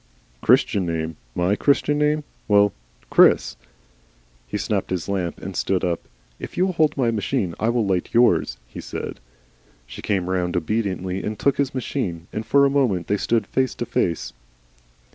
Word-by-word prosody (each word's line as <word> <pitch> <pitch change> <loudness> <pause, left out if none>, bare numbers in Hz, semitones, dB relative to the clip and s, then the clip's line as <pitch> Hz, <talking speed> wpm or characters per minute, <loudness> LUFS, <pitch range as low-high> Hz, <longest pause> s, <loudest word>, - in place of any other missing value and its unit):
"Christian 95 -3 +3
name? 80 -1 -2 0.2
MY 90 +3 +2
Christian 145 +1 +2
name. 150 +1 +2 0.2
Well 105 -2 +4 0.4
Chris." - - +5 0.9
He - - -3
snapped - - -1
his 90 -3 -2
lamp 95 -4 -2
and 95 0 -7
stood 95 -2 0
up. 85 -2 -2 0.3
"If - - -8
you 180 - +3
will 190 - -1
hold 155 -3 +2
my 120 -4 +2
machine, 105 -4 -1
I 110 - +1
will 120 -2 +1
light 95 -2 0
yours," 115 - +3
he - - -8
said. - - -6 0.7
She - - -10
came 95 -4 -1
round 90 -1 0
obediently 95 0 -2
and 105 0 -4
took 140 +5 +1
his 140 -1 -1
machine, 100 -10 -3
and 110 - -3
for 140 +4 +4
a - - +5
moment 120 -12 +1
they 105 - 0
stood 115 +2 +1
face 130 -1 0
to - - -3
face. 85 -7 -1
100 Hz, 170 wpm, -23 LUFS, 90-130 Hz, 0.9 s, Chris